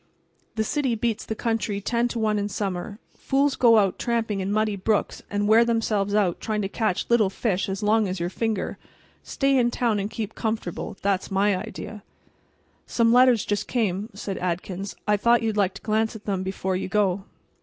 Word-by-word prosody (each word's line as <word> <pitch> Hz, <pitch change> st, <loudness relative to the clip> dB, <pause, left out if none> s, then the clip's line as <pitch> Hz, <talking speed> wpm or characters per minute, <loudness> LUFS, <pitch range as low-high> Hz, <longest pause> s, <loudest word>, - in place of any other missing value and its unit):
"The 220 Hz, -, +1 dB
city 265 Hz, 0 st, 0 dB
beats 225 Hz, -1 st, -2 dB
the 220 Hz, -, -2 dB
country 225 Hz, -3 st, -1 dB
ten 235 Hz, +4 st, 0 dB
to 240 Hz, -, -5 dB
one 215 Hz, -2 st, +1 dB
in 205 Hz, 0 st, -2 dB
summer. 195 Hz, 0 st, -3 dB, 0.2 s
Fools 275 Hz, 0 st, +1 dB
go 230 Hz, -2 st, +5 dB
out 195 Hz, -3 st, +2 dB
tramping 225 Hz, -4 st, -1 dB
in 190 Hz, +1 st, -2 dB
muddy 215 Hz, 0 st, +1 dB
brooks 205 Hz, +2 st, -1 dB
and 205 Hz, 0 st, 0 dB
wear 220 Hz, +2 st, +6 dB
themselves 215 Hz, -3 st, 0 dB
out 195 Hz, -5 st, +2 dB
trying 215 Hz, -2 st, -1 dB
to -, -, 0 dB
catch 215 Hz, -2 st, -1 dB
little 230 Hz, -4 st, +3 dB
fish 195 Hz, -1 st, -1 dB
as 195 Hz, +2 st, -3 dB
long 215 Hz, 0 st, +3 dB
as 185 Hz, 0 st, -3 dB
your 175 Hz, +1 st, -2 dB
finger. 220 Hz, -1 st, -2 dB, 0.4 s
Stay 275 Hz, 0 st, 0 dB
in 245 Hz, -2 st, +3 dB
town 235 Hz, -3 st, 0 dB
and 200 Hz, +1 st, -2 dB
keep 220 Hz, -1 st, -5 dB
comfortable—that's 200 Hz, -2 st, -2 dB
my 200 Hz, +1 st, +2 dB
idea." 210 Hz, +1 st, -7 dB, 0.9 s
"Some 230 Hz, -1 st, +3 dB
letters 250 Hz, -3 st, +5 dB
just 205 Hz, 0 st, -1 dB
came," 210 Hz, -3 st, -1 dB
said 200 Hz, -1 st, -5 dB
Adkins. 185 Hz, +2 st, -3 dB
"I 210 Hz, 0 st, +3 dB
thought 235 Hz, +3 st, +3 dB
you 225 Hz, -, +1 dB
might 215 Hz, -, -3 dB
like 195 Hz, -2 st, +2 dB
to -, -, -9 dB
glance 220 Hz, +1 st, 0 dB
at 215 Hz, -, -10 dB
them 195 Hz, -3 st, -1 dB
before 190 Hz, 0 st, -2 dB
you 185 Hz, -, -2 dB
go." 195 Hz, -1 st, +1 dB
210 Hz, 195 wpm, -25 LUFS, 195-225 Hz, 0.9 s, wear